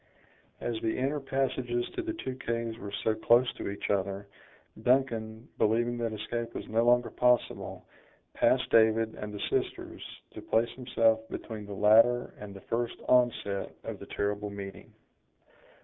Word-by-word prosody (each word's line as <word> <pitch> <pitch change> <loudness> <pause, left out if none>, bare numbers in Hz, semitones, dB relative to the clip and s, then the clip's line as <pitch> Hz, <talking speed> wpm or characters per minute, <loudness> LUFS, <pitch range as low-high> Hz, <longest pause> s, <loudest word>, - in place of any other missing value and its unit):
As 115 -2 -3
the 110 -1 -1
inner 140 +3 0
passages 130 -3 -1
to - - -2
the 335 -1 -3
two 130 - -4
caves 115 -3 -3
were 100 0 -7
so 110 - +3
close 120 +3 +4
to - - -5
each 100 - -3
other, 100 0 -1 0.6
Duncan, 115 -3 +1
believing 120 +2 +2
that 115 -1 -1
escape 115 +2 -4
was - - -5
no 115 +1 +2
longer 120 0 +4
possible, 125 -1 +1 0.5
passed - - +3
David 110 0 +4
and 105 0 -6
the 105 - -7
sisters, - - -2 0.3
to - - -8
place 115 +1 +1
himself 115 -3 +2
between 110 -3 -6
the 100 - -6
latter 115 +4 +5
and 105 -1 -8
the 100 0 -10
first 120 0 -2
onset 120 -5 +2
of - - -6
the - - -10
terrible 105 0 -2
meeting. 100 -1 -8
115 Hz, 155 wpm, -30 LUFS, 105-120 Hz, 0.6 s, latter